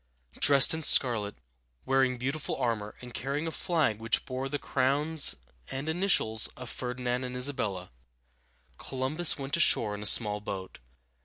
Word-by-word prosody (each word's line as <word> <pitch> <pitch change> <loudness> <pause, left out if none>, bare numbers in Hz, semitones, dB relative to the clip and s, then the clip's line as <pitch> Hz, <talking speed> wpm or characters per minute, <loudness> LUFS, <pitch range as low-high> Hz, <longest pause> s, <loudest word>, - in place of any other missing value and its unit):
Dressed 140 0 +5
in 160 - -3
scarlet, 115 -8 +4 0.5
wearing 130 -1 +1
beautiful 135 +5 -4
armor, 115 -5 -3
and 125 -1 -11
carrying 140 +6 -4
a 165 - -4
flag 155 - -1
which 115 +1 -1
bore 130 +1 -5
the 145 - -2
crowns 145 +3 +1 0.3
and 135 +3 -5
initials 160 - +1
of 125 -2 -7
Ferdinand 125 0 -4
and 125 0 -6
Isabella, 115 - -1 0.9
Columbus 135 +6 +1
went 140 +2 -3
ashore 115 -9 +2
in 105 - -7
a 105 - +1
small 105 0 +5
boat. 95 -2 -7
130 Hz, 145 wpm, -28 LUFS, 115-145 Hz, 0.9 s, Dressed